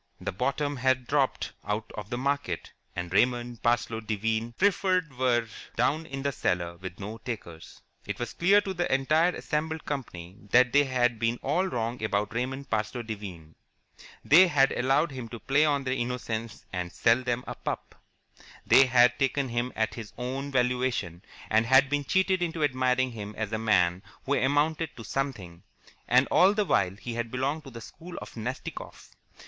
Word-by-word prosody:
The - - -3
bottom 140 +7 -1
had 130 0 +1
dropped 140 0 0
out 105 +1 -3
of 105 -1 -7
the 120 - -3
market, 140 -9 -2 0.2
and 90 0 -4
Raymond 120 +2 +1
Parsloe 120 -1 +1
Devine 110 +1 -2
Preferred 185 -4 +1
were 120 -2 +1 0.3
down 150 +7 +1
in 135 -2 -5
the 140 - +1
cellar 85 -8 -1
with 90 0 -8
no 105 +3 -6
takers. 100 -9 -8 0.2
It - - -3
was 120 - -4
clear 200 +4 +4
to 195 -2 -4
the 175 -1 -1
entire 155 +6 +3
assembled 160 +1 -3
company 95 -10 -6
that 125 +2 +5
they 145 0 +5
had 120 -3 +1
been 115 +1 +1
all 175 +7 +1
wrong 115 -6 -3
about 105 0 -1
Raymond 130 +3 -3
Parsloe 110 +2 -1
Devine. 95 -8 -8 0.7
They 175 +6 +8
had 135 -5 +3
allowed 135 +5 +2
him 125 -4 -7
to 115 - -7
play 140 +5 +3
on 145 -2 +1
their 130 -1 -1
innocence 120 -2 -4
and 90 -1 -3
sell 115 +2 +3
them 125 -1 -2
a - - -5
pup. - - -5 0.7
They 135 0 +6
had 125 0 +4
taken 135 0 +1
him 120 +1 -1
at 110 0 0
his 110 -3 -8
own 130 +3 -4
valuation, 125 -9 0 0.3
and 110 +1 +2
had 135 +2 +5
been 145 -1 0
cheated 190 +1 +2
into 165 -2 -1
admiring 130 -2 +1
him 105 -2 -7
as 110 0 -3
a 110 - 0
man 90 -5 +2 0.2
who 140 - 0
amounted 150 +4 +1
to 115 - -8
something, 105 -10 -4 0.5
and 125 +3 +5
all 195 +3 +5
the 210 -1 +1
while 95 - +1
he 115 +3 -6
had 115 0 -3
belonged 140 +5 -2
to - - -8
the 115 -2 -9
school 175 +9 -10
of - - -9
Nastikoff. 120 +3 -6
125 Hz, 175 wpm, -28 LUFS, 110-140 Hz, 0.7 s, They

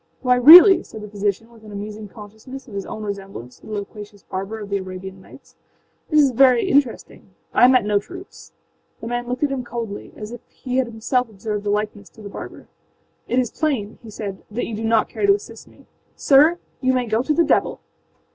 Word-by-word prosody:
â 250 0 +4
âWhy, 250 - -5
really,â 360 +3 +10
said 220 - -11
the 210 - -8
physician, 205 +2 -3
with 225 -2 -19
an 215 - -12
amusing 210 +1 -7
consciousness 220 +7 -12
of 225 - -13
his 200 -1 -5
own 215 - -7
resemblance 195 - -8
to - - -16
the 215 - -7
loquacious 205 0 -8
barber 195 +3 -5
of 205 -1 -8
the 200 - +1
Arabian 190 0 -8
Nights, 270 - -18 0.6
âthis - - 0
is 285 -3 +5
very 250 -1 +4
interesting. 275 -4 -1 0.2
I 245 - +6
met 255 -4 +4
no 205 -1 +2
troops.â 365 - -12 0.5
The - - -9
man 240 +1 -3
looked 250 +3 -3
at 290 - +1
him 265 -2 -3
coldly, 230 -4 -6
as 210 +1 -8
if 240 - -9
he 165 +11 -5
had 260 -2 +1
himself 235 +2 -1
observed 210 0 -5
the - - -1
likeness 210 -1 -3
to - - -12
the 200 - -8
barber. - - -10 0.6
âIt 245 - 0
is 250 -3 +1
plain,â 255 -10 -2
he 230 - -12
said, 200 -2 -7
âthat 230 +4 -3
you 230 - -5
do 225 +2 -4
not 225 -1 +2
care 405 - -2
to 400 - +6
assist 410 - -11
me. - - -20 0.3
Sir, 300 +5 +4 0.2
you 260 -1 +2
may 250 -1 0
go 220 0 0
to 300 +4 0
the 340 - +4
devil! - - +1
220 Hz, 220 wpm, -21 LUFS, 205-255 Hz, 0.6 s, really,â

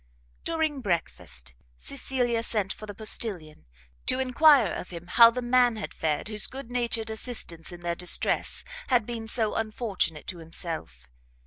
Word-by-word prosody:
During 315 -4 -1
breakfast, 65 - -3 0.2
Cecilia 235 - -1
sent 210 -4 -1
for 215 - -10
the 205 - -7
postilion, 195 -7 -2 0.4
to 255 - +4
enquire 265 - +5
of - - -6
him 170 -1 -8
how 230 +6 +8
the 250 +1 -4
man 245 -1 +4
had 215 - -5
fared, 155 +2 -1
whose 210 -1 +2
good 265 -2 -8
natured 235 -2 -1
assistance 220 -8 -2
in 175 0 -10
their 170 0 -1
distress 180 +1 0 0.2
had 245 -4 +3
been 230 -1 -5
so 220 -1 +1
unfortunate 215 -8 -2
to 175 - -5
himself. 160 - -4
220 Hz, 150 wpm, -27 LUFS, 170-245 Hz, 0.4 s, how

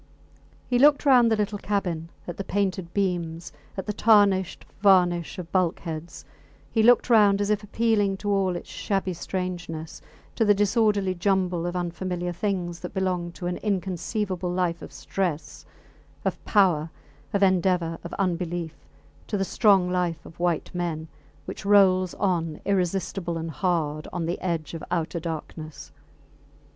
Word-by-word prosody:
He 245 -1 +2
looked 290 +2 +5
round 250 -4 +6
the - - +4
little 210 -1 -2
cabin, 175 -6 -2 0.2
at 175 - -6
the 195 - -3
painted 190 -3 -1
beams, 175 -4 -2 0.2
at 190 - -3
the 210 - -2
tarnished 200 -4 +3
varnish 180 -4 +3
of 175 -2 -7
bulkheads; 170 -2 -2 0.5
he 225 - +2
looked 240 +2 +5
round 210 -4 +5
as 205 +1 0
if 210 0 +1
appealing 210 -2 +1
to 205 +1 -2
all 190 -2 +1
its 175 - -7
shabby 195 -2 -2
strangeness, 175 -3 -5 0.3
to - - +1
the 205 -1 +5
disorderly 205 -2 +2
jumble 180 -2 0
of 175 - -4
unfamiliar 175 0 -3
things 175 -2 -2
that 180 - -8
belong 180 -2 -1
to 180 - -8
an 175 0 -2
inconceivable 190 -1 -2
life 180 -1 -1
of - - -9
stress, 175 -6 -4 0.6
of - - -2
power, 175 -7 +3 0.4
of 200 0 +1
endeavour, 180 -3 +2
of 170 - -7
unbelief 175 -3 -2 0.5
to 210 - -1
the 195 - 0
strong 195 -3 +4
life 180 -2 -1
of 165 - -14
white 175 -1 -1
men, 165 -3 -3 0.4
which - - -7
rolls 190 -3 +4
on 170 -5 -1
irresistible 185 -2 -1
and 165 0 -4
hard 155 -4 -1
on 175 -2 -3
the 170 +2 -3
edge 170 -4 -2
of 165 - -6
outer 170 -1 -1
darkness. 160 -1 -7
185 Hz, 150 wpm, -25 LUFS, 170-200 Hz, 0.6 s, round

